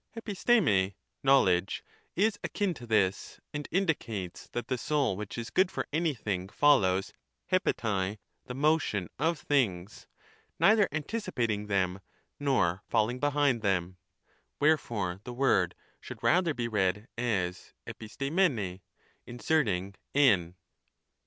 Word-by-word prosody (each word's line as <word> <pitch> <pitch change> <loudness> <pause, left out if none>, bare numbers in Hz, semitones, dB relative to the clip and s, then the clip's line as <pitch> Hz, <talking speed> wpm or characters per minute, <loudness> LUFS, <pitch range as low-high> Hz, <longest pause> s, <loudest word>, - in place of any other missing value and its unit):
'E7TiariiiJ,r] 190 - +2 0.3
(knowledge) 95 -10 +3 0.3
is 205 +3 +1
akin 200 -4 -1
to 125 -6 -11
this, 100 -3 0
and 145 0 -4
indicates 115 - -2
that 120 - -5
the 130 - 0
soul 140 -3 0
which 105 +3 -6
is 115 -1 -5
good 185 0 +3
for - - -4
anything 110 - -1
follows 100 -10 +3 0.4
(eTrerat) 100 -2 0 0.3
the 125 - -5
motion 140 - +1
of 165 +3 +1
things, 105 -11 -1 0.5
neither 210 -1 +5
anticipating 120 - -2
them 95 -2 0 0.4
nor 115 -11 +1
falling 120 +4 +1
behind 145 -3 +2
them: 95 -3 0 0.6
wherefore 115 - +1
the 125 - -7
word 110 -9 +2 0.2
should - - -10
rather 170 -3 +3
be 120 -1 -2
read 105 0 0
as 100 -7 -2
tTTiarrjuevij 120 - -1 0.2
', - - -37
inserting 115 - 0 0.2
iv. 95 -12 +4
120 Hz, 115 wpm, -29 LUFS, 95-145 Hz, 0.6 s, neither